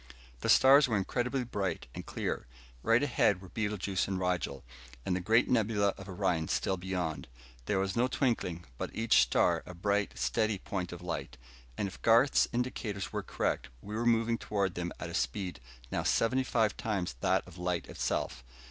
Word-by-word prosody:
The - - -2
stars 135 +2 +7
were 110 -4 +1
incredibly 125 +6 -1
bright 100 - -3
and - - -6
clear. - - -3 0.3
Right 115 - +3
ahead 115 -8 +2
were 95 -1 -12
Betelguese 105 -3 -1
and 95 -1 -1
Rigel, 90 -1 -1 0.4
and 90 - +1
the - - 0
great 110 +6 +3
nebula 110 -4 +2
of 95 0 -10
Orion 90 -4 0
still 95 - 0
beyond. 90 -4 -3 0.4
There 100 - +1
was 95 0 0
no 120 +2 +3
twinkling, 110 - -1
but - - -2
each 115 0 +4
star - - +3
a 90 - -8
bright, 100 +3 0
steady 110 -2 +1
point 90 -1 -4
of 90 0 -8
light. 85 -2 -4 0.4
And 100 - 0
if 95 - -10
Garth's 115 +4 +5
indicators 120 -6 -3
were - - -1
correct, - - -2
we 105 +10 -9
were 120 +2 0
moving 115 0 +2
toward 100 -3 -1
them 90 -1 -3
at - - -5
a - - -8
speed 90 +9 -2 0.3
now - - 0
seventy 130 +3 +2
five 110 -4 +1
times 95 - -2
that - - +2
of - - -12
light 90 -1 -1
itself. 65 - -2
100 Hz, 180 wpm, -31 LUFS, 90-115 Hz, 0.4 s, stars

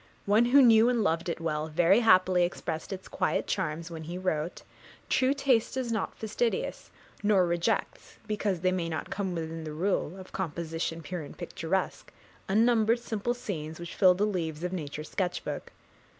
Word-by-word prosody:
One 210 +4 +4
who 270 +3 +6
knew 230 -1 +6
and 240 -3 +1
loved 165 -1 0
it 170 - -3
well 155 -2 -2
very 175 +6 +4
happily 185 -5 +5
expressed 165 -1 -3
its 190 -1 -6
quiet - - 0
charms, 170 -2 -2
when 160 -1 -7
he 175 +3 -5
wrote 175 -2 -2 0.5
True 260 0 +3
taste 270 -4 +1
is 250 -3 -2
not 220 -3 -2
fastidious, 225 +2 -2 0.3
nor 205 -3 +4
rejects, 175 +5 -1
Because 205 -4 -1
they 185 0 +2
may 175 -2 -1
not 160 - -4
come 190 -3 -2
within 165 0 -4
the 155 -1 -6
rule 180 +1 -1
Of 185 -1 -11
composition 165 -2 -3
pure 180 +3 -4
and 145 - -10
picturesque, 175 +1 -3 0.4
Unnumbered 225 +2 +4
simple 235 0 -2
scenes 160 -9 -5
which 170 -1 -7
fill 185 -2 +5
the 200 +3 +1
leaves 165 -6 -3
Of 180 +1 -2
Nature's 150 -3 -5
sketch 180 -2 -1
book. - - -5
185 Hz, 175 wpm, -29 LUFS, 165-215 Hz, 0.5 s, who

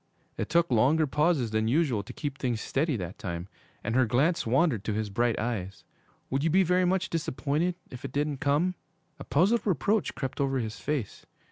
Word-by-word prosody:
It - - -3
took 170 0 +2
longer 135 +8 +4
pauses 150 -4 +1
than 110 0 +1
usual 130 -4 +2
to 105 +5 -10
keep 145 0 -5
things 120 -4 -1
steady 140 +3 0
that 90 +1 -6
time, 85 -1 -4 0.4
and 115 - -2
her 130 -1 +3
glance 135 +6 +2
wandered 130 - +2
to 110 - -1
his 110 -1 -2
bright 120 +1 +1
eyes. 105 -5 -3 0.5
'Would 135 +2 0
you 165 - +2
be 190 +4 +4
very 180 +1 +3
much 185 +1 0
disappointed 165 +2 -1 0.2
if 125 +2 -9
it 135 - -5
didn't 145 0 -1
come?' 145 +7 +1 0.5
A - - -6
puzzled 200 +10 +3
reproach 200 - +1
crept 135 -1 -3
over 135 -1 +1
his 110 -4 -4
face. 145 -9 -3
135 Hz, 195 wpm, -28 LUFS, 115-165 Hz, 0.5 s, longer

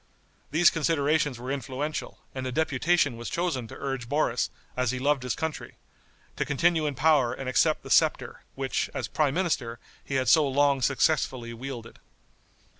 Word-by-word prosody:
These 165 +4 +5
considerations 150 -3 +1
were 125 +2 -5
influential, 140 +2 -4 0.2
and 130 -1 -4
a - - -3
deputation 145 -1 +1
was 120 - -6
chosen 165 -9 -2
to - - -10
urge 135 -4 -4
Boris, 125 -6 +1 0.3
as 125 -1 0
he 130 - -1
loved 140 +1 +1
his 125 -1 -2
country, 160 -1 -5 0.6
to - - +1
continue 160 +2 +1
in 145 - -3
power 140 -3 +3
and 135 - -6
accept 130 - +2
the - - -8
scepter, - - +2
which, 135 0 -1
as - - -2
prime 145 -3 0
minister, 140 -11 -1 0.3
he 135 - -4
had 130 -1 +1
so 150 +4 +5
long 140 0 +2
successfully 130 -3 +1
wielded. 120 -1 -8
135 Hz, 165 wpm, -27 LUFS, 125-155 Hz, 0.6 s, These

